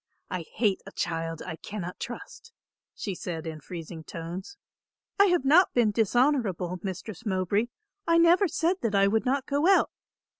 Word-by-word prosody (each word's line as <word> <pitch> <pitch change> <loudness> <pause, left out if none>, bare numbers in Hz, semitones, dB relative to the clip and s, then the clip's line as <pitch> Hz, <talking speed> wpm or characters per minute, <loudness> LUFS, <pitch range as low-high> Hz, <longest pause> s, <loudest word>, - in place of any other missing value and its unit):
I 180 -3 -3
hate 210 -4 +2
a - - -8
child 165 -1 -3
I 160 - -5
cannot 180 -3 -6
trust," 400 - -8 0.4
she 200 - -4
said 170 -2 -5
in 160 -1 -6
freezing 165 0 -8
tones. 175 - -7 0.6
"I 400 - +8
have 355 -6 +2
not 330 +7 +5
been 235 -3 +4
dishonourable, 220 - +1
Mistress 195 +2 -6
Mowbray. 200 +2 0 0.4
I 335 0 +5
never 345 +4 +5
said 335 +3 +1
that 220 -3 0
I 195 0 +5
would 220 +4 +2
not 270 +1 +1
go 285 +5 +1
out. 390 - +5
210 Hz, 160 wpm, -28 LUFS, 175-285 Hz, 0.6 s, I